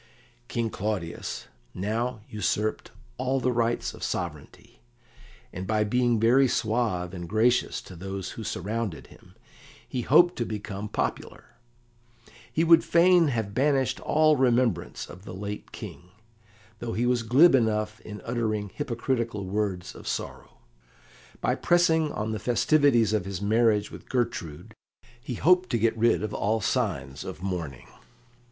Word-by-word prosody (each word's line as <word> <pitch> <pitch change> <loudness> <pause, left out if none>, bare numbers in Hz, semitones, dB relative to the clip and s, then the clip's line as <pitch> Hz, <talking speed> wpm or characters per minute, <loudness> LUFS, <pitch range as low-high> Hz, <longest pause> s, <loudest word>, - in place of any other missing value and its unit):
King 115 -2 -2
Claudius 95 -5 -4 0.3
now 110 +5 -2
usurped 105 0 -1 0.3
all 130 +1 0
the 125 0 +1
rights 120 -1 0
of - - -13
sovereignty, 75 -6 -5 0.7
and 95 +1 -5
by 110 -1 +2
being 120 +1 +2
very 125 +5 +5
suave 110 -7 -1
and 85 -2 -7
gracious 115 +4 +2
to 90 - -11
those 95 +2 -5
who 115 - -7
surrounded 105 -1 -3
him - - -18 0.5
he 125 - -3
hoped 175 +8 +5
to 120 - 0
become 105 -2 -5
popular. - - -4 1.0
He 160 - +1
would 165 0 +6
fain 175 0 +5
have 110 -7 -2
banished 135 -1 +1
all 155 -1 +3
remembrance 120 -8 +1
of 90 +1 -12
the 90 -3 -8
late 100 +2 -6
King, 90 +1 -9 0.7
though 115 -1 -4
he 120 - 0
was 125 -1 +2
glib 130 +9 +6
enough 110 -3 +1
in 105 -1 -9
uttering 110 -3 -2
hypocritical 115 -4 -2
words 95 -2 -2
of - - -11
sorrow. - - -5 0.8
By - - +2
pressing 160 -3 +2
on 110 -3 -3
the 110 - -3
festivities 120 0 +3
of 105 -4 0
his 95 -2 -4
marriage 105 0 +2
with - - -12
Gertrude, 115 - -3 0.5
he 125 0 -5
hoped 180 +8 +3
to 120 - +1
get 115 +1 +2
rid 115 -1 +2
of 110 - -3
all 110 +3 0
signs 70 -8 -2
of - - -8
mourning. 85 -9 -4
110 Hz, 145 wpm, -27 LUFS, 100-125 Hz, 1.0 s, would